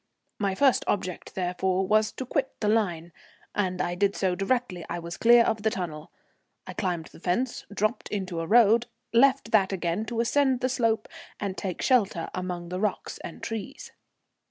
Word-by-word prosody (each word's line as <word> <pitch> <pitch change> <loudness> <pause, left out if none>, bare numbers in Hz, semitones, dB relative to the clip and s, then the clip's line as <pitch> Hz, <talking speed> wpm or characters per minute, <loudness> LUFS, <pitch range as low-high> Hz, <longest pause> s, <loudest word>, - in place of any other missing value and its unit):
My 200 -2 0
first 270 +3 +4
object, 185 -3 -2
therefore, 185 +1 0
was 215 +2 +3
to 260 - -5
quit 265 +1 -2
the 210 - -1
line, 175 -7 0 0.4
and 185 -3 -1
I 175 - 0
did 200 +3 +1
so 190 -2 +1
directly 195 -1 -1
I 175 - -2
was 170 0 -6
clear 235 0 +6
of 220 -2 0
the 220 - +2
tunnel. 160 -6 -5 0.5
I - - -7
climbed 175 -5 -2
the - - -14
fence, 190 +9 -1
dropped 215 +4 -1
into 185 -4 -3
a 165 - -3
road, 230 +2 +5 0.3
left 260 -1 +4
that 200 -3 +4
again 180 +2 -1
to 230 0 -4
ascend 260 +2 +2
the 255 - +1
slope 230 -4 +1 0.3
and 200 -2 -3
take 190 -4 -4
shelter 200 -10 +2
among 180 -2 -4
the 180 +1 -3
rocks 210 +1 -2
and - - -9
trees. 225 -2 -6
200 Hz, 180 wpm, -27 LUFS, 180-230 Hz, 0.5 s, clear